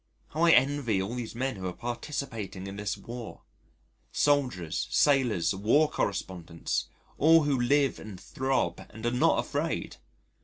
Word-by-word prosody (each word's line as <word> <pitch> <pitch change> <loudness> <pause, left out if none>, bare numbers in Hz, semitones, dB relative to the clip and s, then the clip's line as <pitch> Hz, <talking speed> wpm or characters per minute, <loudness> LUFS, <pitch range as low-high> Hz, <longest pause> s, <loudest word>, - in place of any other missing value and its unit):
How 155 - -4
I - - +5
envy 130 -6 +3
all 95 +5 -3
these 120 -2 -5
men 130 -1 -2
who 95 -1 -4
are 90 - -4
participating 120 - -5
in 100 0 -6
this 105 0 -3
War 120 -2 -8 0.7
soldiers, 125 - +1
sailors, 125 - +3
war 115 +11 +3
correspondents 90 -4 -3 0.3
all 160 +2 +6
who 140 -4 +1
live 140 +2 +2
and 105 -4 -9
throb 130 0 -1
and 110 +1 -9
are 120 - +2
not 125 - +3
afraid. - - -2
120 Hz, 145 wpm, -28 LUFS, 100-140 Hz, 0.7 s, all